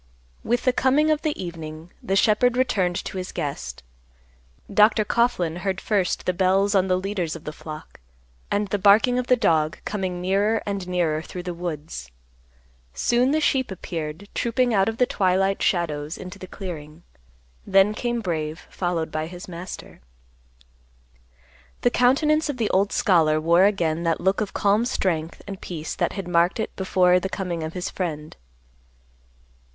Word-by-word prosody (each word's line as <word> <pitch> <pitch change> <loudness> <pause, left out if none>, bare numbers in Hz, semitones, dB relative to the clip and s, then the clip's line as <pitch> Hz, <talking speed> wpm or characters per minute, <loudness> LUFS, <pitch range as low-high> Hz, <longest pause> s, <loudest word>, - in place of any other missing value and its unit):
With 240 +2 0
the 255 - +3
coming 285 +5 +3
of 305 -1 +1
the 310 -2 -2
evening, 165 -1 -7
the 195 - -1
shepherd 235 +4 +3
returned 190 -8 +1
to - - -5
his 180 - -5
guest. 145 - -5 0.9
Dr. 215 +1 +5
Coughlan 185 -10 +1
heard 190 0 -2
first 195 -4 0
the 180 - +1
bells 190 +3 +2
on 190 -1 +3
the 185 -1 +2
leaders 185 -4 -2
of 165 - -9
the 150 - -6
flock, 155 0 -10 0.5
and 205 0 0
the 205 - -1
barking 215 +6 +5
of 250 - -3
the 250 - +5
dog 160 -8 +1
coming 190 -4 -3
nearer 200 +4 +1
and 200 -3 -3
nearer 170 -4 0
through 180 +2 -7
the 180 -1 -4
woods. 155 - -6 0.9
Soon 240 - +2
the 305 +3 +2
sheep 265 -4 +1
appeared 165 -1 -6
trooping 240 +1 +1
out 195 0 +3
of 225 - -5
the 250 - +4
twilight 195 -2 +1
shadows 155 -3 0
into 185 +2 -9
the 185 - -8
clearing; 165 -4 -8 0.6
then 195 +2 +5
came 240 +1 -2
Brave 160 -4 -3
followed 175 -3 -2
by 155 0 -2
his 180 +3 -9
master. 180 - -9 1.8
The 245 - +3
countenance 300 +6 +3
of 285 - -2
the 225 -3 0
old 195 +2 +2
scholar 160 -5 +3
wore 170 +4 +4
again 170 -6 +1
that 165 -1 0
look 190 +3 +1
of 205 - -2
calm 205 +3 +2
strength 170 -9 -2
and 195 -2 -7
peace 160 -3 -5
that - - -1
had 195 -3 -5
marked 175 +3 +2
it 220 - -3
before 180 -1 +3
the 190 - -4
coming 180 -4 -3
of 160 +1 -4
his 180 0 -4
friend. 155 -4 -4
185 Hz, 165 wpm, -24 LUFS, 170-210 Hz, 1.8 s, Dr